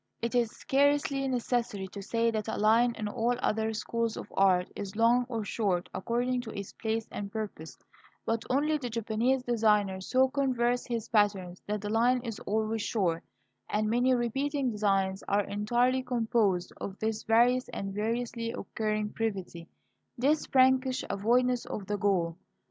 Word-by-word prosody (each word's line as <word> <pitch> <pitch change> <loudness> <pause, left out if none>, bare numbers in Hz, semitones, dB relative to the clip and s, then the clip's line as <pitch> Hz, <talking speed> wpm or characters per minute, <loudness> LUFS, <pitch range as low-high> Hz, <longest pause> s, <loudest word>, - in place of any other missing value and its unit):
It 235 +1 -2
is 240 -2 +2
scarcely 280 +1 +1
necessary 240 -6 -1
to 200 - -8
say 230 +3 +1
that 215 -1 -3
a 220 - -2
line, 230 +3 +4
in 215 - -3
all 235 +3 0
other 220 -2 0
schools 230 +1 -2
of - - -8
art, 185 -2 +4
is 200 -1 -6
long 235 +2 +3
or 225 -4 -3
short 195 -5 -1
according 245 +4 -1
to 240 - -8
its 200 -1 -6
place 220 0 -2
and 200 -1 -5
purpose; 180 - -6 0.5
but 225 0 -1
only 300 +4 +2
the 250 -3 -4
Japanese 230 +3 0
designer 210 -5 +2
so 260 +7 +3
contrives 250 -3 0
his 230 -3 -3
patterns 200 -5 +1
that 210 0 -2
the 205 - -4
line 240 +3 +3
is 225 -3 -5
always 220 +1 0
short; 180 -7 0 0.5
and 215 +1 0
many 250 +2 +3
repeating 270 +3 -1
designs 195 -2 0
are 205 +1 +2
entirely 240 +6 +1
composed 225 -7 0
of 195 0 -6
this 220 0 -2
various 245 +3 +3
and 195 0 -5
variously 230 +2 -2
occurring 215 -1 -2
brevity, 190 -7 -4 0.5
this 290 +5 +1
prankish 260 0 +3
avoidance 245 +4 +2
of 200 - -5
the 205 +1 -2
goal. 175 -5 +1
225 Hz, 160 wpm, -29 LUFS, 205-245 Hz, 0.5 s, line